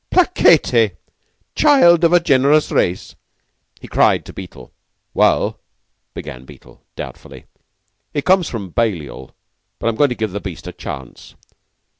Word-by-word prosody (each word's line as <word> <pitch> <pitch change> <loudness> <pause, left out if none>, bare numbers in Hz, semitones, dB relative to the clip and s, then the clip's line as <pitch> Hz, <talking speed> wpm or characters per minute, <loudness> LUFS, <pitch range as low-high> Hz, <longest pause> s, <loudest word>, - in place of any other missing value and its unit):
"Placetne, 365 0 +3 0.6
child 175 - +5
of 170 - +4
a 175 - +6
generous 145 -1 +2
race!" 90 +1 -1 0.7
he - - -10
cried - - +2
to - - -11
Beetle. 75 -10 -11 0.4
"Well," - - +1 0.6
began 65 0 -8
Beetle, 65 - -17
doubtfully, - - -10 0.7
"he 145 - -3
comes 185 -3 +2
from 100 -6 -6
Balliol, 85 - -3 0.4
but - - -1
I'm 115 - -3
going 145 +4 +3
to 125 - -3
give 110 -3 -3
the 100 - -4
beast 85 -4 -8
a 90 - -6
chance. 65 -7 -10
115 Hz, 135 wpm, -18 LUFS, -, 0.7 s, a